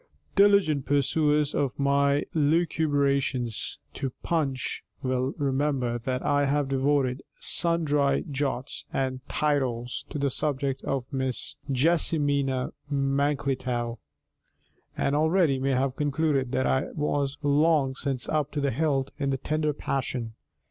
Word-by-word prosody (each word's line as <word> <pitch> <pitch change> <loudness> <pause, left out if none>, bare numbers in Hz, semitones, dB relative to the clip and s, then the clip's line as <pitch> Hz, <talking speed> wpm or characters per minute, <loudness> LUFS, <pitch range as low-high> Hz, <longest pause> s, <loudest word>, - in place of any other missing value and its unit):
_ - - -35
Diligent 200 -9 +4
perusers 150 +1 +2
of 140 -3 -1
my 140 +1 +2
lucubrations 145 - +1 0.2
to 135 - -3
Punch 140 -6 -1 0.2
will 130 +1 0
remember 135 -4 0
that 125 +2 -3
I 145 0 +3
have 140 0 +1
devoted 135 -1 +1 0.2
sundry 150 -5 +2
jots 135 -2 -3
and 130 -1 -1
tittles 130 -5 -1
to - - -5
the 140 -1 0
subject 135 -1 -1
of 135 0 -3
Miss 130 -2 -2 0.2
JESSIMINA 140 -2 +1 0.2
MANKLETOW, 135 -4 0 1.0
and 140 - +1
already 160 -2 +3
may 135 +1 +1
have 130 0 0
concluded 145 -3 0
that 130 0 +1
I 130 - +2
was 145 -1 -1
long 145 -1 +3
since 135 -2 -3
up 150 -2 0
to 150 - -1
the 140 -1 +1
hilt 140 0 0
in 140 -1 0
the 135 - 0
tender 150 +3 0
passion. 130 -5 -3
140 Hz, 125 wpm, -27 LUFS, 130-150 Hz, 1.0 s, Diligent